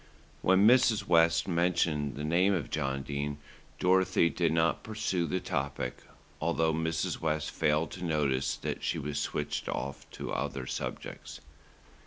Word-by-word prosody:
When 95 +2 +4
Mrs. 120 -2 +5
West 85 +2 +4
mentioned 85 -5 +1
the 75 - -5
name 90 +6 +3
of 80 -7 -4
John 70 -3 -1
Dene, 70 +1 -3 0.4
Dorothy 90 -2 +3
did 85 -3 +1
not 80 0 +2
pursue 95 -5 -1
the 95 +5 -1
topic, 70 -4 -3 0.4
although 80 0 +1
Mrs. 80 0 -1
West 75 -1 -1
failed 75 +2 +1
to 95 - -7
notice 75 -5 0
that - - -4
she - - -1
was 70 0 -3
switched 75 0 -3
off 70 0 -4
to - - -5
other 65 -1 -3
subjects. - - -6
80 Hz, 145 wpm, -30 LUFS, 75-90 Hz, 0.4 s, Mrs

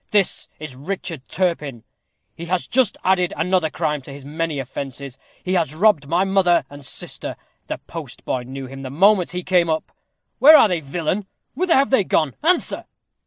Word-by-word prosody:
This 205 -3 +1
is 155 -4 -8
Richard 165 -1 -5
Turpin. 150 -10 -1 0.5
He 170 - -7
has 180 +1 -1
just 260 -1 +1
added 180 -1 +2
another 175 0 +1
crime 150 -1 -2
to 135 - -11
his 140 -1 -10
many 160 +1 -3
offences. 135 0 -6 0.2
He 185 - -1
has 165 -5 +1
robbed 170 -6 +3
my 175 +3 +3
mother 180 -5 +3
and 145 0 -11
sister. - - -4 0.3
The - - -3
postboy 125 -1 -6
knew 135 +1 -6
him 135 +1 -9
the 130 - -6
moment 185 +5 +4
he 180 0 -4
came 180 -2 +2
up. 160 0 -2 0.5
Where 305 +3 +10
are - - +6
they, 180 -4 0
villain? 170 +7 -2 0.3
Whither 360 -1 +2
are 275 - +5
they 265 -7 +3
gone? 155 -6 +1
answer!" 345 +3 +1
170 Hz, 175 wpm, -21 LUFS, 140-190 Hz, 0.5 s, Where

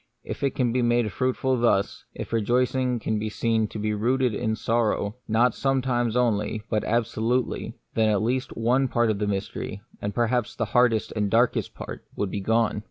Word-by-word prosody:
If - - -6
it 140 -2 0
can 120 -3 +1
be 125 - +2
made 120 -2 +2
fruitful 130 +3 0
thus, 110 -4 +1
if - - -6
a - - +4
rejoicing 125 +2 +1
can 110 -1 -1
be 110 +1 -2
seen 110 0 +1
to 110 - -8
be 105 0 -1
rooted 125 +3 +1
in 110 0 -1
sorrow, 110 -1 0
not 115 +2 +3
sometimes 125 -4 0
only, 110 -3 +1
but 105 - +1
absolutely, 120 +2 -1 0.2
then 110 -1 +3
at 105 -1 +2
least 125 +3 -1
one 125 +4 +2
part 120 -2 +2
of 100 - -3
the 105 - 0
mystery, 100 0 -3 0.2
and 100 0 -3
perhaps 120 -1 0
the 115 - -1
hardest 120 -3 +3
and 105 -1 +1
the - - -3
darkest 115 +3 +2
part, - - -7
would 100 -2 -2
be 100 - -3
gone. 110 +1 +1
115 Hz, 195 wpm, -25 LUFS, 110-125 Hz, 0.2 s, a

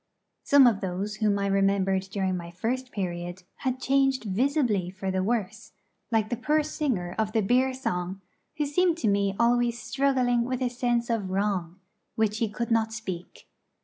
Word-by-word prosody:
Some 280 -2 +6
of 225 -5 +3
those 195 +3 -3
whom 210 -2 +2
I 200 - -1
remembered 195 -1 +2
during 190 -2 -1
my 170 -1 -6
first 245 +9 -3
period 175 -2 -4
had 260 -1 -2
changed 270 -1 +2
visibly 220 - +1
for 190 +1 -4
the 190 0 0
worse, 215 0 -2 0.4
like 220 -2 +1
the - - +1
poor 300 +6 +1
singer 250 - -2
of 215 -1 0
the 225 - +3
beer 255 +6 +3
song, 190 -8 -3 0.4
who 300 - +1
seemed 340 +4 +2
to 315 - -1
me 200 -1 +1
always 240 0 +2
struggling 250 -1 +1
with 255 +1 -2
a 250 - +1
sense 240 -1 0
of 210 -5 -1
wrong, 190 -2 -1 0.4
which 220 -1 +1
he 225 - +1
could 235 +2 -4
not 225 -1 +2
speak. 190 -6 -7
220 Hz, 175 wpm, -27 LUFS, 195-250 Hz, 0.4 s, Some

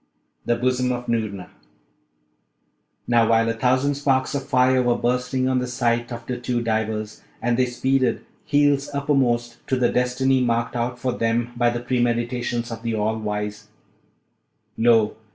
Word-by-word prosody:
THE 120 - +3
BOSOM 125 +1 0
OF 120 0 -5
NOORNA 110 -5 -2 1.6
Now, 115 -2 +3
while 115 0 +3
a 115 - +1
thousand 130 +4 +1
sparks 135 -2 0
of 140 -1 -3
fire 130 0 +3
were 120 -1 +2
bursting 125 +1 0
on 130 -1 +2
the 125 - -2
sight 120 -1 -1
of 120 0 -7
the 125 - -3
two 120 -1 -2
divers, 110 -1 -2 0.2
and 120 0 0
they 130 +1 +2
speeded 130 +1 0 0.2
heels 145 -1 +2
uppermost 125 -5 +1
to 130 - +1
the 125 -1 +2
destiny 130 +1 +1
marked 120 -1 0
out 120 +1 -2
for 125 +1 -1
them 115 0 -1
by 120 0 +2
the 120 0 -3
premeditations 120 -1 -1
of 115 -1 -6
the 115 -1 -2
All 110 +1 -1
Wise, 105 0 -4 1.1
lo! 115 -2 +3
120 Hz, 155 wpm, -23 LUFS, 115-130 Hz, 1.6 s, THE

